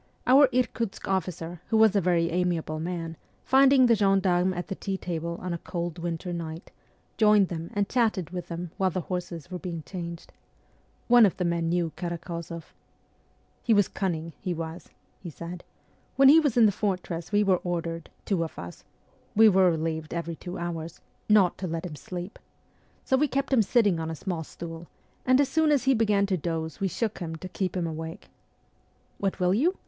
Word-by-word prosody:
Our 270 Hz, +3 st, +7 dB
Irkutsk 235 Hz, -4 st, -1 dB
officer, 175 Hz, -3 st, -3 dB
who 220 Hz, -, +2 dB
was 220 Hz, -2 st, +5 dB
a 200 Hz, -, +4 dB
very 170 Hz, -1 st, +2 dB
amiable 170 Hz, -3 st, -1 dB
man, 165 Hz, -1 st, -4 dB, 0.3 s
finding 265 Hz, 0 st, +6 dB
the 235 Hz, -, +5 dB
gendarmes 190 Hz, -3 st, +2 dB
at 175 Hz, -, -4 dB
the 195 Hz, -, -3 dB
tea 195 Hz, 0 st, -4 dB
table 170 Hz, -2 st, -4 dB
on 180 Hz, -1 st, -4 dB
a 170 Hz, -, -4 dB
cold 170 Hz, -1 st, -4 dB
winter 170 Hz, +1 st, -3 dB
night, 165 Hz, 0 st, -6 dB, 0.5 s
joined 210 Hz, -3 st, +5 dB
them 165 Hz, -1 st, -5 dB
and 205 Hz, -1 st, +1 dB
chatted 215 Hz, -9 st, 0 dB
with 180 Hz, -1 st, -5 dB
them 170 Hz, 0 st, -5 dB
while 190 Hz, -1 st, +2 dB
the 185 Hz, +1 st, -2 dB
horses 175 Hz, -1 st, -5 dB
were 180 Hz, -, -4 dB
being 170 Hz, -4 st, -5 dB
changed. 170 Hz, -2 st, -7 dB, 0.7 s
One 245 Hz, -1 st, +7 dB
of 200 Hz, -, +3 dB
the 180 Hz, -, -1 dB
men 170 Hz, -1 st, 0 dB
knew 170 Hz, -1 st, 0 dB
Karak6 170 Hz, -1 st, -5 dB
zoff. 170 Hz, -1 st, -6 dB, 1.0 s
'He 230 Hz, -, +3 dB
was 205 Hz, -2 st, +4 dB
cunning, 165 Hz, -4 st, -3 dB
he 180 Hz, -3 st, -2 dB
was,' 165 Hz, +1 st, -6 dB, 0.3 s
he 175 Hz, -, -8 dB
said. 170 Hz, +3 st, -8 dB, 0.5 s
'When 270 Hz, 0 st, +7 dB
he 310 Hz, +3 st, +8 dB
was 290 Hz, -7 st, 0 dB
in 235 Hz, -, +7 dB
the 210 Hz, -, +5 dB
fortress 180 Hz, -4 st, -3 dB
we 205 Hz, 0 st, +3 dB
were 190 Hz, -2 st, +3 dB
ordered, 165 Hz, -2 st, -4 dB, 0.2 s
two 185 Hz, -5 st, +1 dB
of 160 Hz, -, -7 dB
us 85 Hz, 0 st, -9 dB, 0.5 s
we 220 Hz, +1 st, +8 dB
were 190 Hz, -2 st, +5 dB
relieved 160 Hz, -1 st, -2 dB
every 170 Hz, 0 st, -3 dB
two 175 Hz, +3 st, -7 dB
hours 170 Hz, -1 st, -5 dB, 0.3 s
not 200 Hz, -4 st, +4 dB
to 185 Hz, -, -3 dB
let 165 Hz, +1 st, -3 dB
him 160 Hz, -4 st, -6 dB
sleep. 180 Hz, +5 st, -7 dB, 0.7 s
So 265 Hz, -, +3 dB
we 300 Hz, +3 st, +3 dB
kept 275 Hz, +1 st, -1 dB
him 245 Hz, -, +6 dB
sitting 205 Hz, -5 st, +2 dB
on 160 Hz, 0 st, -3 dB
a 165 Hz, -, -4 dB
small 170 Hz, -1 st, -4 dB
stool, 165 Hz, +1 st, -9 dB, 0.4 s
and 255 Hz, +1 st, +5 dB
as 280 Hz, -1 st, +3 dB
soon 315 Hz, +2 st, +2 dB
as 285 Hz, -4 st, +3 dB
he 270 Hz, +1 st, +4 dB
began 210 Hz, -4 st, +2 dB
to 195 Hz, -2 st, 0 dB
doze 160 Hz, -1 st, -4 dB
we 195 Hz, -, +1 dB
shook 215 Hz, +4 st, -2 dB
him 165 Hz, -3 st, -4 dB
to 175 Hz, +3 st, -7 dB
keep 185 Hz, 0 st, -3 dB
him 175 Hz, -, 0 dB
awake.... 160 Hz, +3 st, -6 dB, 0.9 s
What 195 Hz, -1 st, -1 dB
will 180 Hz, 0 st, +3 dB
you 320 Hz, -, +2 dB
180 Hz, 195 wpm, -27 LUFS, 165-205 Hz, 1.0 s, he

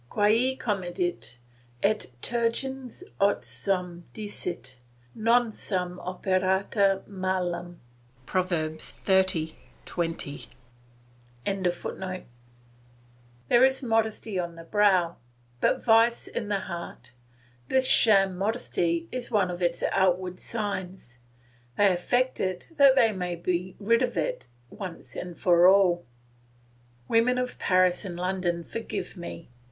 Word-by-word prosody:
"Quae 230 Hz, +6 st, +2 dB
comedit, 175 Hz, -, -2 dB, 0.5 s
et 215 Hz, +1 st, +1 dB, 0.2 s
tergens 250 Hz, +5 st, -2 dB, 0.2 s
os 200 Hz, -10 st, +2 dB
suum 175 Hz, +7 st, -1 dB
dicit; 175 Hz, -, -3 dB, 0.3 s
non 230 Hz, +1 st, +2 dB
sum 180 Hz, -4 st, -3 dB
operata 190 Hz, +1 st, +1 dB
malum." 180 Hz, -3 st, -3 dB, 0.5 s
Prov. 185 Hz, +3 st, 0 dB
xxx. 160 Hz, +1 st, 0 dB, 0.3 s
20.] 165 Hz, -4 st, -4 dB, 1.0 s
There 185 Hz, -3 st, 0 dB, 1.9 s
is 265 Hz, +1 st, +3 dB
modesty 220 Hz, -3 st, 0 dB
on 170 Hz, -1 st, -4 dB
the 165 Hz, -, -10 dB
brow, 185 Hz, -2 st, +2 dB, 0.4 s
but -, -, +1 dB
vice 230 Hz, +1 st, +4 dB
in 215 Hz, -, -4 dB
the 200 Hz, -1 st, -1 dB
heart; 170 Hz, -9 st, -7 dB, 0.6 s
this 260 Hz, 0 st, +2 dB
sham 195 Hz, -4 st, +5 dB
modesty 180 Hz, -5 st, -1 dB
is 250 Hz, -1 st, -4 dB
one 195 Hz, -4 st, +2 dB
of 175 Hz, +1 st, -6 dB
its 175 Hz, -1 st, 0 dB
outward 185 Hz, -1 st, +1 dB
signs; 190 Hz, -, -4 dB, 0.6 s
they 200 Hz, -2 st, +5 dB
affect 245 Hz, +9 st, 0 dB
it 185 Hz, -1 st, -2 dB
that 275 Hz, -2 st, +7 dB
they 235 Hz, -4 st, +5 dB
may 180 Hz, -3 st, -3 dB
be 180 Hz, +2 st, -2 dB
rid 230 Hz, +3 st, +2 dB
of 245 Hz, -6 st, -1 dB
it 155 Hz, -5 st, -2 dB, 0.2 s
once 185 Hz, -5 st, -8 dB, 0.2 s
for 175 Hz, 0 st, +5 dB
all. 185 Hz, -3 st, +4 dB, 1.0 s
Women 240 Hz, +2 st, +3 dB
of 250 Hz, 0 st, -3 dB
Paris 185 Hz, -1 st, +3 dB
and 185 Hz, -4 st, -6 dB
London, 180 Hz, -1 st, -1 dB
forgive 225 Hz, +3 st, -5 dB
me! 170 Hz, -5 st, -9 dB
185 Hz, 110 wpm, -27 LUFS, 175-215 Hz, 1.9 s, that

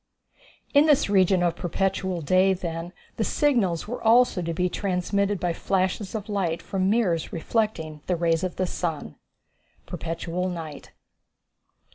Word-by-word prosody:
In 290 Hz, +2 st, +6 dB
this 285 Hz, -8 st, +3 dB
region 185 Hz, -2 st, +4 dB
of 175 Hz, -1 st, +1 dB
perpetual 190 Hz, 0 st, -1 dB
day, 185 Hz, +5 st, +3 dB
then, 170 Hz, -1 st, -5 dB, 0.3 s
the 220 Hz, -, +1 dB
signals 215 Hz, -, +1 dB
were 245 Hz, +3 st, -5 dB
also 230 Hz, -4 st, +4 dB
to 170 Hz, -1 st, -2 dB
be 180 Hz, +2 st, 0 dB
transmitted 200 Hz, +1 st, -1 dB
by 175 Hz, -1 st, 0 dB
flashes 190 Hz, +3 st, -1 dB
of 210 Hz, -2 st, -4 dB
light 190 Hz, -6 st, -1 dB
from 190 Hz, -1 st, -1 dB
mirrors 200 Hz, -7 st, +1 dB
reflecting 165 Hz, -5 st, -2 dB
the 180 Hz, -, +1 dB
rays 165 Hz, 0 st, +1 dB
of 185 Hz, -2 st, -2 dB
the 185 Hz, -, 0 dB
sun. 160 Hz, -, -3 dB, 0.7 s
Perpetual 170 Hz, +2 st, -3 dB
Night! 160 Hz, -5 st, -7 dB
185 Hz, 140 wpm, -25 LUFS, 170-200 Hz, 0.7 s, In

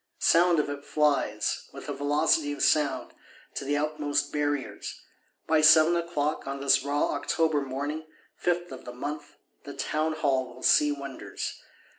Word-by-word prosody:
Sound 175 Hz, 0 st, +4 dB
of 150 Hz, -, 0 dB
it 145 Hz, 0 st, -6 dB
flies, 150 Hz, -2 st, 0 dB
with -, -, -9 dB
a -, -, -3 dB
velocity 145 Hz, +1 st, +1 dB
of 145 Hz, -, -3 dB
sound, 135 Hz, -5 st, +1 dB, 0.4 s
to -, -, -4 dB
the 145 Hz, +1 st, 0 dB
outmost 150 Hz, -1 st, -1 dB
Barriers. 145 Hz, -2 st, -3 dB, 0.5 s
By 160 Hz, -1 st, +3 dB
seven 155 Hz, +2 st, +7 dB
o'clock, 160 Hz, -4 st, -2 dB
on 140 Hz, 0 st, -4 dB
this 140 Hz, 0 st, +4 dB
raw 145 Hz, +1 st, 0 dB
October 160 Hz, -3 st, 0 dB
morning, 145 Hz, +4 st, -4 dB, 0.3 s
fifth 175 Hz, 0 st, -1 dB
of 130 Hz, -, -9 dB
the 125 Hz, -, -7 dB
month, 145 Hz, +3 st, -6 dB, 0.3 s
the 140 Hz, -1 st, -9 dB
Townhall 145 Hz, -3 st, -1 dB
will 130 Hz, -, -13 dB
see 150 Hz, 0 st, +5 dB
wonders. 140 Hz, -2 st, -6 dB
145 Hz, 150 wpm, -27 LUFS, 140-155 Hz, 0.5 s, seven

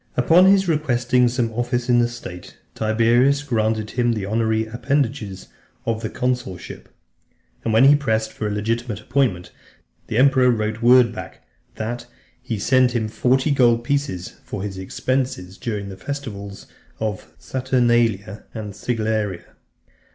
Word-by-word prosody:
V. -, -, +2 dB
Upon 175 Hz, +7 st, +6 dB
his 195 Hz, -1 st, +4 dB
requesting 125 Hz, -6 st, +2 dB
some 120 Hz, -2 st, -1 dB
office 120 Hz, +1 st, -1 dB
in 120 Hz, -1 st, +4 dB
the 120 Hz, -, +3 dB
state, 90 Hz, -7 st, -9 dB, 0.2 s
Tiberius 120 Hz, +6 st, +2 dB
granted 110 Hz, -5 st, -1 dB
him 120 Hz, -1 st, +1 dB
the 105 Hz, -3 st, -3 dB
honorary 110 Hz, +1 st, 0 dB
appendages 120 Hz, -4 st, -2 dB, 0.4 s
of 115 Hz, -1 st, -1 dB
the 110 Hz, -, -3 dB
consulship, 125 Hz, -8 st, -4 dB, 0.7 s
and 115 Hz, -, -1 dB
when 110 Hz, +3 st, +5 dB
he 140 Hz, +2 st, +8 dB
pressed 110 Hz, -6 st, -1 dB
for 110 Hz, -, -3 dB
a -, -, -2 dB
legitimate 110 Hz, +1 st, -2 dB
appointment, 115 Hz, -11 st, -1 dB, 0.6 s
the 110 Hz, -, -2 dB
emperor 130 Hz, -1 st, +5 dB
wrote 110 Hz, -1 st, -1 dB
word 120 Hz, -1 st, +6 dB
back, -, -, -9 dB, 0.3 s
that 120 Hz, +2 st, -5 dB, 0.3 s
"he 115 Hz, -, -4 dB
sent 130 Hz, +4 st, +3 dB
him 110 Hz, -2 st, 0 dB
forty 130 Hz, +6 st, +1 dB
gold 120 Hz, -4 st, +3 dB
pieces 140 Hz, -9 st, -2 dB
for -, -, -6 dB
his 100 Hz, -2 st, -5 dB
expenses, 95 Hz, -2 st, -2 dB
during 105 Hz, -5 st, -4 dB
the 95 Hz, -, -9 dB
festivals 100 Hz, -8 st, -7 dB, 0.3 s
of 110 Hz, -3 st, -3 dB
the -, -, -29 dB
Saturnalia 120 Hz, -5 st, 0 dB
and 105 Hz, -3 st, -6 dB
Sigillaria." 110 Hz, -3 st, -2 dB
115 Hz, 145 wpm, -21 LUFS, 110-130 Hz, 0.7 s, he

